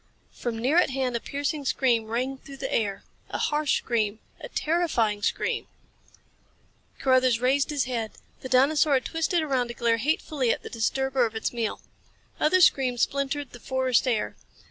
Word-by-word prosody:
From 235 -2 -4
near 260 +8 +1
at 355 - +5
hand 260 -2 -1
a - - 0
piercing 285 +4 -3
scream 240 -4 +1
rang 255 +4 -2
through 275 0 -11
the 270 0 -4
air. 200 -3 -1 0.3
A - - -3
harsh 295 -1 +1
scream. 215 -3 -1 0.2
A - - -8
terrifying 300 - 0
scream! - - -1 1.3
Carruthers 255 -3 +3
raised 265 +3 +2
his 290 -3 0
head. 235 -3 -3 0.3
The 260 - -7
dinosaur 285 +3 +4
had 260 - 0
twisted 325 +1 0
around 260 -5 0
to 240 - -7
glare 230 -1 +2
hatefully 275 0 0
at - - 0
the - - -8
disturber 260 +2 +1
of 225 - -12
its 220 - -2
meal. 230 -3 -2 0.6
Other 365 +5 +4
screams 255 -7 +4
splintered 280 0 -2
the 245 - -11
forest 260 0 +1
air. 225 -4 0
260 Hz, 165 wpm, -26 LUFS, 235-285 Hz, 1.3 s, at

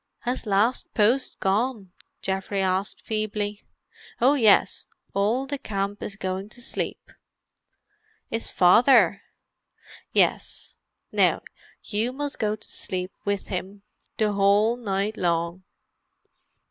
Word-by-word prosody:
"Has 245 -1 -3
'Last 210 +5 +1
Post' 235 +5 +2
gone?" 205 0 0 0.3
Geoffrey 195 +1 -2
asked 190 +1 0
feebly. 210 -1 -2 0.6
"Oh 255 +4 +5
yes. 225 -8 +4 0.3
All 220 +7 +1
the 285 0 -4
camp 200 -4 -3
is 200 - -5
going 190 +1 -4
to 240 - -15
sleep." 245 - -4 1.2
"Is 225 0 -1
Father?" 200 +1 +5 0.9
"Yes. - - 0 0.4
Now - - +2 0.4
you 220 +3 -1
must 285 +1 -4
go 210 -1 +1
to 215 - -9
sleep 185 -1 -4
with 200 -1 -2
him, 195 +2 -5 0.3
the 215 -1 +2
whole 205 +3 +4
night 205 -2 -2
long." 170 +1 -1
205 Hz, 110 wpm, -25 LUFS, 195-230 Hz, 1.2 s, Oh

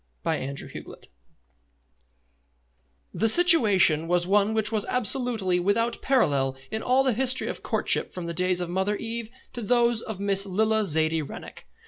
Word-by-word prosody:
CHAPTER 140 -4 -4
I - - -9 2.2
The 225 - +2
situation 210 - +5
was 175 0 0
one 205 +3 +1
which 220 0 0
was 215 -2 -1
absolutely 240 -7 0
without 225 +6 -1
parallel 140 - 0
in 220 - -3
all 260 +2 +2
the 260 -2 +1
history 255 +2 0
of - - -6
courtship - - -1
from 180 -2 -7
the 170 - -5
days 180 +1 0
of 175 - -4
Mother 190 +3 -1
Eve 230 +1 -5 0.2
to 240 - -7
those 235 0 +1
of 220 -5 -7
Miss 195 -1 0
Lilla 220 +3 0
Zaidie 160 -1 0
Rennick. 145 - -11
205 Hz, 150 wpm, -25 LUFS, 175-235 Hz, 2.2 s, situation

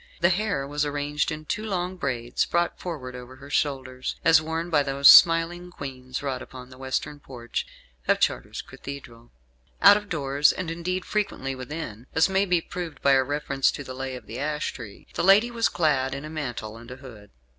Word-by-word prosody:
The 175 - +4
hair 195 -6 0
was 145 +1 -1
arranged 145 +1 -1
in 155 0 -6
two 215 +7 -3
long 185 -3 -2
braids, 125 -7 -1
brought 170 0 0
forward 135 -8 -6
over 125 +1 -10
her 140 +2 -13
shoulders; 130 -3 -1
as 165 -1 +6
worn 165 +2 -3
by 150 -2 +4
those 140 0 +3
smiling 170 +1 +7
Queens 130 -5 -7
wrought 130 -2 -3
upon 130 -1 -11
the 130 - -13
western 135 +3 -3
porch 120 -4 -5 0.4
of - - +3
Chartres - - -1
Cathedral. 120 -4 -10 0.5
Out 200 +1 +8
of 210 -1 -8
doors, 140 -2 +2
and, 175 -3 -4
indeed, 180 +2 -3
frequently 195 -10 -2
within, 130 -3 -7
as 160 - +5
may 190 +1 +2
be 180 -3 +2
proved 165 -4 -6
by 140 - +5
a 135 -1 +5
reference 140 -1 0
to 145 - -6
"The 130 - -8
Lay 130 0 -5
of 125 - -10
the - - -7
Ash 150 +1 -2
Tree," 115 -5 -10
the - - -1
lady 205 +6 +5
was 230 -1 +1
clad 135 -5 +1
in 140 +2 -6
a 155 - -8
mantle 120 -8 -5
and 115 +1 -12
a 125 - -7
hood. 115 -6 -13
145 Hz, 200 wpm, -25 LUFS, 130-170 Hz, 0.5 s, Out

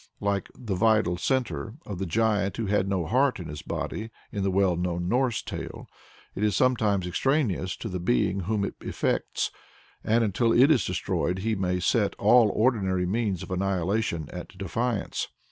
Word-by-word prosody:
Like 100 -1 -1
the 115 -6 -4
vital 105 -2 +3
centre 125 +1 -1
of 100 -4 -6
"the 95 - -2
giant 100 0 +1
who 115 - -1
had 100 -1 +1
no 95 -4 0
heart 130 - +2
in 85 - -6
his 75 0 -6
body" 110 +1 -4 0.2
in 100 - -3
the 95 - +1
well 95 -1 +2
known 90 0 -2
Norse 120 +1 +1
tale, - - -7 0.5
it - - -5
is 105 -3 +2
something 125 -1 +3 0.2
extraneous 100 - 0
to - - -5
the 90 -3 -3
being 90 +4 +1
whom 100 +2 -1
it - - -4
affects, - - -1 0.5
and 115 +2 +3
until 115 +3 +2
it 135 +6 +6
is 140 - +3
destroyed 90 +2 -1
he 110 - +1
may 90 -3 0
set 100 +4 +1
all 110 +1 +5
ordinary 100 -6 +1
means 100 -1 -1
of - - -9
annihilation 95 -2 0
at 90 +1 -8
defiance. 110 +4 -2
100 Hz, 175 wpm, -27 LUFS, 90-115 Hz, 0.5 s, it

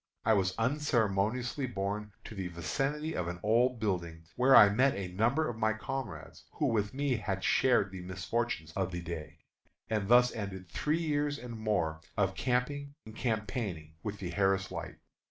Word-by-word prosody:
I 110 - +5
was 95 -3 +1
unceremoniously 120 -1 +1
borne 105 -1 -3
to - - -9
the 95 -3 -4
vicinity 135 - -2
of 85 - -1
an 90 0 -4
old 120 +3 +3
building, 85 -6 -2
where 130 +2 +6
I 105 - +10
met 130 +7 +3
a 95 -2 -4
number 120 - +1
of 115 -2 -5
my 110 -1 +2
comrades, 110 +2 -6
who 150 - -1
with 110 -5 +1
me 140 -2 0
had 95 -3 -3
shared 125 -7 +3
the 95 -1 -7
misfortunes 90 -1 -2
of 95 +2 -2
the 85 -1 -4
day. 80 -2 -7 0.5
And 105 -3 0
thus 125 +2 +6
ended 95 -4 -5
three 150 - 0
years 145 -2 0
and 125 -2 -8
more 100 -8 -1 0.2
of - - +2
camping 140 +3 -1
and 110 0 -11
campaigning 105 -9 -2
with 105 -1 -4
the 90 -3 -5
Harris 95 0 +1
Light. - - -5
110 Hz, 170 wpm, -31 LUFS, 95-125 Hz, 0.5 s, I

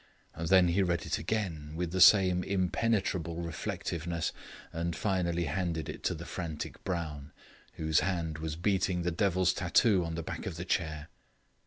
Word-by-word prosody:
Then 90 +2 +4
he 90 +4 +2
read 85 -3 0
it - - -1
again 80 -5 -3
with 85 0 -2
the 95 0 0
same 90 -3 +7
impenetrable 95 -3 0
reflectiveness, 85 0 -3 0.4
and 85 +1 -2
finally 85 -4 0
handed 80 0 -2
it - - -6
to - - +1
the - - -8
frantic 80 -4 -5
Brown, 80 -5 -4 0.4
whose 80 -1 +2
hand 85 -4 -2
was 80 -1 -3
beating 90 0 +1
the 90 - 0
devil's 95 0 +2
tattoo 95 +2 +3
on 80 -1 -4
the 85 - -3
back 90 - -5
of 90 - -4
the 85 - -5
chair. 80 -4 -2
85 Hz, 160 wpm, -31 LUFS, 80-95 Hz, 0.4 s, same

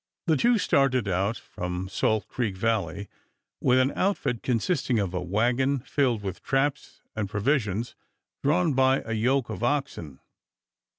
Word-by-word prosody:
The 160 - +3
two 235 - +3
started 135 - +2
out 95 +4 0
from 90 +1 -5
Salt 105 +3 0
Creek 110 -7 -3
Valley 100 -3 -1 0.5
with 125 - +4
an 130 +2 +3
outfit 185 - 0
consisting 125 +1 0
of 100 -4 -1
a 90 - -2
wagon 120 +9 +1
filled 125 -6 0
with 95 -2 -5
traps 135 +1 -1
and 105 -3 -2
provisions, 110 0 0 0.5
drawn 160 +2 +2
by 130 +1 +3
a 115 - -3
yoke 120 +2 +1
of 95 - -6
oxen. 120 - -2
120 Hz, 140 wpm, -26 LUFS, 100-135 Hz, 0.5 s, with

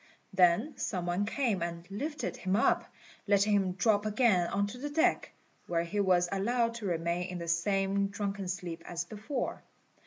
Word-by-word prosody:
Then 190 - +3
some 185 -7 -2
one 180 +4 0
came 225 - 0
and 170 0 -4
lifted 290 +9 -3
him 185 +1 0
up, 225 - +2 0.4
letting 205 +1 +4
him 190 -3 +2
drop 205 +2 +2
again 210 -5 +3
on 200 +3 0
to 235 +5 -7
the 290 +3 -4
deck, 315 +2 +1 0.4
where 170 -1 +1
he 195 +5 -3
was 180 -3 +3
allowed 230 +4 +1
to 215 -4 -4
remain 170 +1 -1
in 180 -1 -5
the 170 -1 -6
same 195 +3 +1
drunken 200 -1 -3
sleep 180 -2 -4
as 175 0 -3
before. 220 +7 -4
195 Hz, 175 wpm, -31 LUFS, 175-215 Hz, 0.4 s, letting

